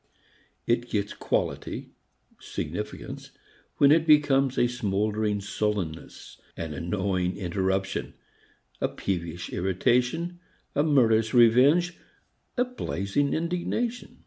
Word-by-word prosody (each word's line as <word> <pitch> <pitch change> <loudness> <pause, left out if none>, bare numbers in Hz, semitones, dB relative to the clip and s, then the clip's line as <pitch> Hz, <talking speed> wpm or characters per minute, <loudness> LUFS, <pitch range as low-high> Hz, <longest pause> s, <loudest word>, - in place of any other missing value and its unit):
It 120 +1 0
gets 100 -1 -1
quality, - - -2 0.5
significance, - - -6 0.5
when 140 0 +6
it 160 +1 +4
becomes 140 -3 +4
a - - +4
smouldering 105 -2 -1
sullenness, 100 -5 -4 0.2
an 80 -2 -4
annoying 90 +2 -1
interruption, 95 +1 -2 0.7
a - - +3
peevish 85 -2 -4
irritation, 125 - 0 0.3
a 145 - +2
murderous 115 -7 +3
revenge, 135 +10 +5 0.6
a 250 - +3
blazing 140 - -1
indignation. 180 +9 -2
115 Hz, 95 wpm, -27 LUFS, 95-145 Hz, 0.7 s, when